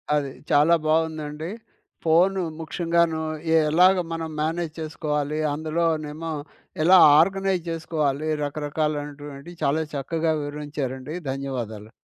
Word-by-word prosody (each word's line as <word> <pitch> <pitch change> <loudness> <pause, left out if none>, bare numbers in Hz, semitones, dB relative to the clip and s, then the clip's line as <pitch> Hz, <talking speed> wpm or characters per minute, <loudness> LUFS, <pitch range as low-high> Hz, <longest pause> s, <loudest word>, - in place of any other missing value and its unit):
అది. 140 -2 -1 0.2
చాలా 150 +4 +5
బాగుందండి. 155 0 -1 0.5
ఫోన్ 175 +4 +4 0.2
ముఖ్యంగాను, 165 0 0 0.5
ఎలాగ 180 +4 +6 0.2
మనం 165 -1 -4
మేనేజ్ 160 0 -2
చేసుకోవాలి? 150 -1 -2
అందులోనేమో 160 0 -2 0.5
ఎలా 185 +3 +7 0.2
ఆర్గనైజ్ 190 +1 +2
చేసుకోవాలి, 155 -3 -1 0.2
రకరకాలైనటువంటి 145 0 -4
చాలా 155 +3 +2
చక్కగా 160 +3 0
వివరించారండి. 145 -1 -5 0.2
ధన్యవాదాలు. 120 -6 -5
155 Hz, 90 wpm, -24 LUFS, 145-165 Hz, 0.5 s, ఎలా